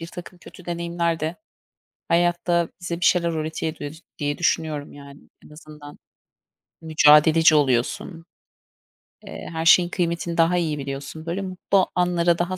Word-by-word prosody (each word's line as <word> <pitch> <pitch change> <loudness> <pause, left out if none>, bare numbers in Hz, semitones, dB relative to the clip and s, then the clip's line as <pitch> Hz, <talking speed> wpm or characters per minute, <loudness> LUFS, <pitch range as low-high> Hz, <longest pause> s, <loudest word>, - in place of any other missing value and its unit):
birtakım 175 +2 -10
kötü 180 - -15
deneyimler 170 -1 -2
de 160 +2 -3 0.7
hayatta 175 0 +1
bize 175 -1 -5
bir - - -1
şeyler 170 -1 +3
öğretiyor 155 -1 -4 0.2
diye 145 -1 -2
düşünüyorum, 155 -4 -1
yani. 140 0 -13 0.2
En - - -17
azından 150 -1 -13 0.8
mücadeleci 155 +1 +5
oluyorsun. 145 +5 0 1.0
Eee, - - -8
her 160 0 -4
şeyin 175 +1 +6
kıymetini 170 -1 -2
daha 170 +2 +3
iyi 160 -4 -1
biliyorsun. 140 +3 -7
Böyle 175 +4 -3
mutlu 185 0 0
anlara 175 -1 +2
daha 175 +2 -2
165 Hz, 130 wpm, -23 LUFS, 155-175 Hz, 1.0 s, şeyin